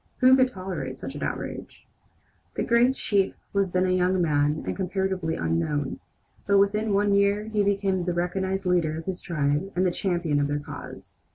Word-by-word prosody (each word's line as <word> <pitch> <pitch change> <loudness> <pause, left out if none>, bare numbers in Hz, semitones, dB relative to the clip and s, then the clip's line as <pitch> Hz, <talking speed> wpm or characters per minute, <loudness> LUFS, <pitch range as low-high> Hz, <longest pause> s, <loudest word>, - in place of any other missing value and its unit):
Who 255 0 +6
could 260 -1 +4
tolerate 185 - -5
such 135 - -7
an 145 - -8
outrage? - - -5 0.7
The - - -1
great 240 +2 +3
chief 200 -6 0 0.2
was 200 -1 +1
then 185 +1 +1
a 185 - +1
young 185 0 +2
man 150 -2 +1
and - - -2
comparatively 190 -3 -1
unknown; 85 - -1 0.5
but 200 0 +4
within 210 +2 +2
one 200 0 +2
year 200 +1 +3
he 215 -1 +1
became 195 -2 0
the 180 - 0
recognized 190 +2 -1
leader 170 -4 +1
of 165 - -7
his 185 -1 -4
tribe 150 +2 -1
and 185 +1 +2
the 180 - +2
champion 175 -5 0
of 145 - +1
their 145 0 -1
cause. 145 0 -9
185 Hz, 185 wpm, -26 LUFS, 155-200 Hz, 0.7 s, Who